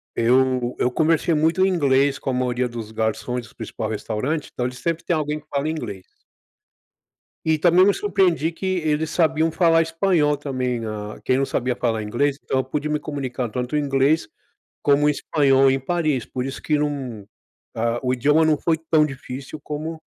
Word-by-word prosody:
eu 125 Hz, +1 st, +2 dB
eu -, -, +2 dB
conversei 160 Hz, +4 st, +2 dB
muito 160 Hz, +5 st, +3 dB
em -, -, +3 dB
inglês 140 Hz, -5 st, +2 dB
com -, -, -4 dB
a -, -, 0 dB
maioria 125 Hz, 0 st, 0 dB
dos 115 Hz, -2 st, -7 dB
garçons 115 Hz, +2 st, -2 dB
do -, -, -21 dB
principal 110 Hz, -1 st, -5 dB
restaurante. 115 Hz, +8 st, -3 dB
Então 125 Hz, -, -2 dB
eles 125 Hz, 0 st, -7 dB
sempre 165 Hz, +2 st, -2 dB
têm 175 Hz, -, 0 dB
alguém 150 Hz, 0 st, -2 dB
que 150 Hz, -, -24 dB
fala 140 Hz, +1 st, -1 dB
inglês. 110 Hz, -12 st, -5 dB, 1.4 s
E 160 Hz, -1 st, +2 dB
também 175 Hz, +3 st, +5 dB
me 200 Hz, -, +4 dB
surpreendi 185 Hz, -6 st, +1 dB
que 170 Hz, +3 st, -7 dB
eles 155 Hz, -1 st, 0 dB
sabiam 160 Hz, -1 st, +2 dB
falar 165 Hz, -1 st, +4 dB
espanhol 165 Hz, -3 st, +1 dB
também, 130 Hz, -4 st, -2 dB
né, 115 Hz, -, -5 dB
ah, 105 Hz, 0 st, -6 dB
quem 130 Hz, -, +2 dB
não 135 Hz, -, +1 dB
sabia 125 Hz, -1 st, -1 dB
falar 115 Hz, -3 st, -1 dB
inglês. 135 Hz, +7 st, 0 dB
Então, 130 Hz, -, 0 dB
eu -, -, +1 dB
pude 145 Hz, +3 st, -3 dB
me 150 Hz, 0 st, 0 dB
comunicar 130 Hz, -5 st, -4 dB
tanto 125 Hz, +3 st, -4 dB
o -, -, +3 dB
inglês 140 Hz, +2 st, +1 dB, 0.5 s
como 145 Hz, 0 st, +3 dB
o -, -, +5 dB
espanhol 135 Hz, -2 st, +3 dB
em 135 Hz, 0 st, +1 dB
Paris, 150 Hz, -3 st, -1 dB
por 125 Hz, -, -4 dB
isso 135 Hz, 0 st, -6 dB
que 150 Hz, -, +1 dB
não 130 Hz, -8 st, -3 dB, 0.5 s
ah, 115 Hz, +1 st, 0 dB
o 125 Hz, -, 0 dB
idioma 145 Hz, +5 st, +3 dB
não 155 Hz, -1 st, +3 dB
foi 165 Hz, +2 st, +1 dB
tão 155 Hz, -2 st, +5 dB
difícil 135 Hz, +1 st, -7 dB
como 155 Hz, +2 st, -5 dB
140 Hz, 190 wpm, -22 LUFS, 125-155 Hz, 1.4 s, também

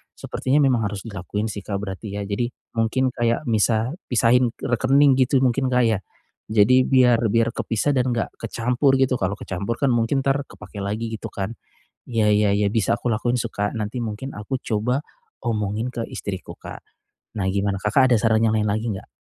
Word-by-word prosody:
sepertinya 135 Hz, +3 st, 0 dB
memang 125 Hz, -5 st, +2 dB
harus 100 Hz, -1 st, -6 dB
dilakuin 105 Hz, +1 st, -4 dB
sih, 105 Hz, -, -5 dB
Kak, 100 Hz, -, -3 dB
berarti 100 Hz, +1 st, -6 dB
ya. 105 Hz, -, -3 dB
Jadi, 105 Hz, +4 st, -1 dB, 0.3 s
mungkin 125 Hz, +4 st, +1 dB
kayak 120 Hz, +3 st, 0 dB
misah 110 Hz, +2 st, +2 dB, 0.2 s
pisahin 125 Hz, +1 st, +4 dB
rekening 135 Hz, +3 st, +3 dB
gitu 130 Hz, +1 st, +3 dB
mungkin, 130 Hz, +1 st, +2 dB
Kak, 125 Hz, 0 st, +3 dB
ya? 110 Hz, -4 st, +2 dB, 0.5 s
Jadi 115 Hz, +4 st, +5 dB
biar 125 Hz, -3 st, +5 dB
biar 115 Hz, +2 st, +2 dB
kepisah 115 Hz, +4 st, 0 dB
dan 125 Hz, -1 st, +1 dB
enggak 115 Hz, -, -1 dB
kecampur 125 Hz, +4 st, +1 dB
gitu. 130 Hz, -1 st, +3 dB
Kalau 95 Hz, +1 st, 0 dB
kecampur 100 Hz, +5 st, -3 dB
kan 140 Hz, -, +2 dB
mungkin 120 Hz, +4 st, +1 dB
entar 135 Hz, +1 st, +2 dB
kepake 105 Hz, -, -11 dB
lagi 110 Hz, +3 st, -3 dB
gitu 110 Hz, -, -6 dB
kan. 100 Hz, +3 st, -3 dB, 0.6 s
Ya 110 Hz, -3 st, +2 dB
ya 105 Hz, -1 st, +3 dB
ya 105 Hz, -, +2 dB
bisa 110 Hz, -4 st, +1 dB
aku 120 Hz, -, -3 dB
lakuin 120 Hz, +3 st, 0 dB
sih, 115 Hz, -, -3 dB
Kak. 105 Hz, +1 st, -2 dB
Nanti 110 Hz, +3 st, -3 dB
mungkin 115 Hz, +4 st, -5 dB
aku 125 Hz, +6 st, -3 dB
coba 125 Hz, +5 st, -1 dB, 0.4 s
omongin 110 Hz, +1 st, -1 dB
ke 115 Hz, -1 st, -3 dB
istriku, 95 Hz, -2 st, -6 dB
Kak. -, -, -9 dB, 0.6 s
Nah 95 Hz, -, 0 dB
gimana 100 Hz, 0 st, 0 dB
Kakak 125 Hz, +5 st, +3 dB
ada -, -, +6 dB
saran 110 Hz, -1 st, +3 dB
yang 110 Hz, 0 st, +2 dB
lain 105 Hz, -, +1 dB
lagi 110 Hz, +3 st, -1 dB
enggak? 95 Hz, -, -7 dB
115 Hz, 185 wpm, -23 LUFS, 105-125 Hz, 0.6 s, ada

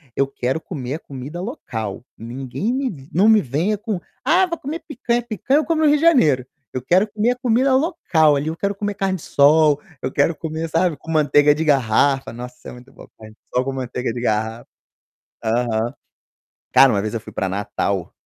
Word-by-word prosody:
eu 140 Hz, -, +2 dB
quero 135 Hz, +2 st, -3 dB
comer 135 Hz, -8 st, -5 dB
a -, -, -6 dB
comida 140 Hz, +6 st, -8 dB
local, 115 Hz, -, -5 dB
ninguém 130 Hz, -, -4 dB
me 200 Hz, -, -4 dB
não 190 Hz, +6 st, +3 dB
me 220 Hz, -1 st, +6 dB
venha 170 Hz, -, -1 dB
com: 210 Hz, -2 st, -3 dB, 0.2 s
"Ah, 350 Hz, +8 st, +4 dB
vou 340 Hz, -1 st, -4 dB
comer 310 Hz, +4 st, -5 dB
picanha", 240 Hz, -4 st, -1 dB
picanha 240 Hz, -, 0 dB
eu -, -, -1 dB
como 320 Hz, -1 st, 0 dB
no 310 Hz, -, +4 dB
Rio 295 Hz, -, +4 dB
de -, -, -5 dB
Janeiro, 160 Hz, -, +4 dB, 0.3 s
eu 130 Hz, -, -3 dB
quero 180 Hz, +10 st, +3 dB
comer 220 Hz, +3 st, +1 dB
a -, -, -1 dB
comida 255 Hz, +2 st, +2 dB
local 260 Hz, -, +2 dB
ali, 140 Hz, +2 st, -3 dB
eu 160 Hz, -, -2 dB
quero 200 Hz, +3 st, -1 dB
comer 205 Hz, 0 st, -3 dB
carne-de-sol, 155 Hz, -6 st, +3 dB, 0.2 s
eu -, -, -2 dB
quero 170 Hz, -, +2 dB
comer, 160 Hz, +1 st, -4 dB
sabe, 165 Hz, +1 st, +1 dB
com 165 Hz, -, -8 dB
manteiga 150 Hz, -1 st, +4 dB
de 160 Hz, +2 st, -2 dB
garrafa, 135 Hz, 0 st, +2 dB
nossa, 125 Hz, +1 st, -8 dB
é -, -, -8 dB
muito 125 Hz, +2 st, -14 dB
bom -, -, -14 dB
carne-de-sol 110 Hz, +3 st, -4 dB
com 135 Hz, -, -2 dB
manteiga 125 Hz, -2 st, -3 dB
de 120 Hz, -, -5 dB
garrafa. 110 Hz, 0 st, -1 dB, 0.8 s
Aham. 115 Hz, 0 st, 0 dB, 0.8 s
Cara, 135 Hz, 0 st, +7 dB
uma 100 Hz, -, +1 dB
vez 110 Hz, +2 st, -4 dB
eu 115 Hz, -, -3 dB
fui 110 Hz, -, -11 dB
para 95 Hz, -, -2 dB
Natal, 100 Hz, -1 st, -2 dB
150 Hz, 195 wpm, -21 LUFS, -, 0.8 s, Cara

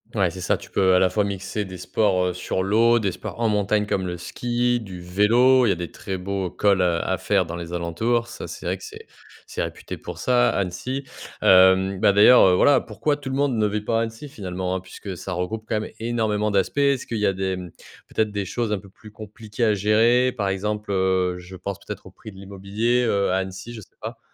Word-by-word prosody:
Ouais, 95 Hz, -5 st, +2 dB
c'est 95 Hz, -, -8 dB
ça, -, -, +1 dB
tu -, -, -14 dB
peux 95 Hz, -1 st, +3 dB
à -, -, +5 dB
la 95 Hz, 0 st, +3 dB
fois 105 Hz, +1 st, +1 dB
mixer 100 Hz, +1 st, -3 dB
des 95 Hz, -1 st, -8 dB
sports, 95 Hz, 0 st, +1 dB
heu, -, -, -3 dB
sur 90 Hz, +1 st, -2 dB
l'eau, 115 Hz, +4 st, +4 dB
des 100 Hz, -5 st, 0 dB
sports 115 Hz, -, -8 dB
en 115 Hz, -, +2 dB
montagne 105 Hz, 0 st, +1 dB
comme 95 Hz, -2 st, -1 dB
le 90 Hz, -1 st, -4 dB
ski, 120 Hz, +6 st, -1 dB
du 95 Hz, -5 st, -9 dB
vélo. 115 Hz, +8 st, +4 dB
Il -, -, +3 dB
y -, -, +4 dB
a -, -, +1 dB
des 85 Hz, -2 st, -6 dB
très 95 Hz, -1 st, -5 dB
beaux 95 Hz, 0 st, -3 dB
cols 100 Hz, +1 st, +2 dB
à 85 Hz, -2 st, +2 dB
à 95 Hz, -, -2 dB
faire 95 Hz, -4 st, +1 dB
dans 85 Hz, +1 st, -6 dB
les 85 Hz, 0 st, -7 dB
alentours. 110 Hz, +8 st, 0 dB
Ça -, -, -8 dB
c'est -, -, -9 dB
vrai -, -, -1 dB
que -, -, -15 dB
c'est 440 Hz, +1 st, -10 dB, 0.4 s
c'est -, -, -5 dB
réputé -, -, -5 dB
pour -, -, -8 dB
ça, 120 Hz, -1 st, +3 dB
Annecy, 100 Hz, +9 st, -3 dB, 0.4 s
hem, 95 Hz, +1 st, +5 dB
bah, 105 Hz, -2 st, +5 dB
d'ailleurs, 105 Hz, +5 st, +7 dB
heu, 90 Hz, -, +4 dB
voilà 140 Hz, +6 st, +5 dB
pourquoi 145 Hz, +7 st, -2 dB
tout 140 Hz, -2 st, -7 dB
le 130 Hz, -, -2 dB
monde 140 Hz, -3 st, +1 dB
ne 105 Hz, -1 st, +2 dB
vit 105 Hz, +1 st, -2 dB
pas 115 Hz, +1 st, 0 dB
à -, -, +1 dB
Annecy 115 Hz, +6 st, -5 dB
finalement, 95 Hz, -4 st, -4 dB
hein? 95 Hz, -, -1 dB
Puisque 95 Hz, +1 st, -9 dB
ça 90 Hz, +1 st, -6 dB
regroupe 110 Hz, +5 st, -3 dB
quand 110 Hz, -, +1 dB
même -, -, -6 dB
énormément 110 Hz, -2 st, 0 dB
d'aspects. 100 Hz, +6 st, 0 dB
Est-ce 140 Hz, -2 st, +2 dB
qu'il 115 Hz, -, -4 dB
y 105 Hz, -, +1 dB
a 95 Hz, -, +2 dB
des, 95 Hz, 0 st, -2 dB
mmh, 90 Hz, -1 st, -7 dB, 0.4 s
peut-être 110 Hz, -1 st, -1 dB
des 100 Hz, -1 st, -3 dB
choses 115 Hz, +2 st, -2 dB
un 105 Hz, -, 0 dB
peu 100 Hz, -, -15 dB
plus 105 Hz, +2 st, -15 dB
compliquées 110 Hz, +1 st, -5 dB
à 105 Hz, -, +3 dB
gérer? 115 Hz, +5 st, +3 dB
Par 105 Hz, -5 st, -1 dB
exemple, 105 Hz, +2 st, -2 dB
heu, 95 Hz, -1 st, +1 dB
je 90 Hz, +1 st, -11 dB
pense 95 Hz, +2 st, -5 dB
peut-être -, -, -7 dB
au -, -, -13 dB
prix 110 Hz, -, -12 dB
de -, -, -16 dB
l'immobilier, 100 Hz, +5 st, -1 dB
heu, 100 Hz, -3 st, +1 dB
à 95 Hz, -, +2 dB
Annecy, 95 Hz, +4 st, -5 dB
je 110 Hz, -, -8 dB
sais -, -, -19 dB
pas. -, -, -7 dB
100 Hz, 245 wpm, -23 LUFS, 95-115 Hz, 0.4 s, d'ailleurs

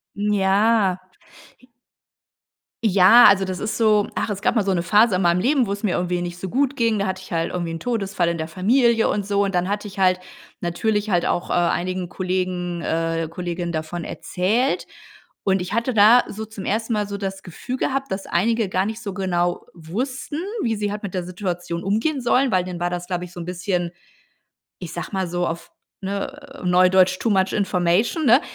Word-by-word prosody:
Ja. 205 Hz, 0 st, +2 dB, 1.9 s
Ja, 205 Hz, +4 st, +7 dB
also 195 Hz, -1 st, +3 dB
das 185 Hz, -1 st, -4 dB
ist 215 Hz, 0 st, -3 dB
so 215 Hz, -2 st, +3 dB
ach, -, -, -2 dB
es 200 Hz, 0 st, -4 dB
gab -, -, +1 dB
mal 210 Hz, -, +3 dB
so 195 Hz, -, +1 dB
'ne 170 Hz, -1 st, 0 dB
Phase 210 Hz, +1 st, +4 dB
in 185 Hz, -, 0 dB
meinem 175 Hz, 0 st, +3 dB
Leben, 255 Hz, +1 st, +2 dB
wo -, -, -3 dB
es 200 Hz, +2 st, -4 dB
mir 200 Hz, -, +1 dB
irgendwie 175 Hz, 0 st, -1 dB
nicht 175 Hz, 0 st, -5 dB
so 185 Hz, 0 st, -5 dB
gut 275 Hz, +4 st, +1 dB
ging, 230 Hz, -4 st, +1 dB
da 200 Hz, -, 0 dB
hatte 190 Hz, -, -3 dB
ich 185 Hz, -, -13 dB
halt 165 Hz, -1 st, -1 dB
irgendwie 175 Hz, -2 st, -2 dB
'n 165 Hz, -, -5 dB
Todesfall 200 Hz, -7 st, -1 dB
in 170 Hz, 0 st, 0 dB
der 160 Hz, 0 st, -4 dB
Familie 230 Hz, +6 st, +3 dB
und 205 Hz, -2 st, -1 dB
so 200 Hz, 0 st, +1 dB
und 195 Hz, -2 st, -2 dB
dann 180 Hz, +2 st, +1 dB
hatte 205 Hz, +1 st, -2 dB
ich 195 Hz, 0 st, -9 dB
halt, 185 Hz, -1 st, +3 dB, 0.4 s
natürlich 205 Hz, +5 st, -1 dB
halt 175 Hz, -2 st, +2 dB
auch, 175 Hz, -, -1 dB
äh, -, -, 0 dB
einigen 175 Hz, +1 st, 0 dB
Kollegen, 180 Hz, -2 st, -2 dB
äh, 165 Hz, -1 st, -1 dB
Kolleginnen 175 Hz, 0 st, -4 dB
davon 160 Hz, +1 st, -4 dB
erzählt 220 Hz, +9 st, -1 dB, 0.6 s
und 190 Hz, -1 st, +2 dB
ich 180 Hz, -, -5 dB
hatte 235 Hz, +2 st, 0 dB
da 220 Hz, +4 st, +7 dB
so 220 Hz, +2 st, -6 dB
zum 215 Hz, -2 st, -9 dB
ersten 225 Hz, +3 st, -1 dB
Mal 210 Hz, -2 st, 0 dB
so 200 Hz, 0 st, -5 dB
das 195 Hz, -1 st, -4 dB
Gefühl 245 Hz, +9 st, -6 dB
gehabt, 270 Hz, 0 st, -2 dB
dass 195 Hz, 0 st, -3 dB
einige 225 Hz, +4 st, +1 dB
gar 185 Hz, +1 st, 0 dB
nicht 220 Hz, +2 st, -4 dB
so 200 Hz, -4 st, -5 dB
genau 175 Hz, -2 st, -1 dB
wussten, 255 Hz, -, -4 dB, 0.2 s
wie 225 Hz, -1 st, 0 dB
sie 205 Hz, -1 st, -2 dB
halt 210 Hz, 0 st, -6 dB
mit 195 Hz, -, -5 dB
der 180 Hz, -1 st, -2 dB
Situation 175 Hz, -1 st, -4 dB
umgehen 230 Hz, +9 st, 0 dB
sollen, 250 Hz, +1 st, +2 dB
weil 185 Hz, -1 st, +2 dB
dann 175 Hz, -1 st, -6 dB
war 175 Hz, -, +1 dB
das, 175 Hz, 0 st, -5 dB
glaube 180 Hz, -1 st, -2 dB
ich, 180 Hz, -, -9 dB
so 175 Hz, -, -10 dB
'n 170 Hz, -, -5 dB
bisschen, 180 Hz, -1 st, -2 dB, 0.9 s
ich -, -, -8 dB
sage -, -, -4 dB
mal 190 Hz, -2 st, -1 dB
so 175 Hz, 0 st, -1 dB
auf, 165 Hz, +1 st, -5 dB, 0.3 s
ne, 270 Hz, +9 st, -6 dB
Neu-Deutsch, 185 Hz, +1 st, +4 dB
too 230 Hz, -, -1 dB
much 190 Hz, -2 st, +2 dB
information, 195 Hz, -, +1 dB
ne, 245 Hz, +3 st, +6 dB
190 Hz, 205 wpm, -22 LUFS, 175-220 Hz, 1.9 s, Ja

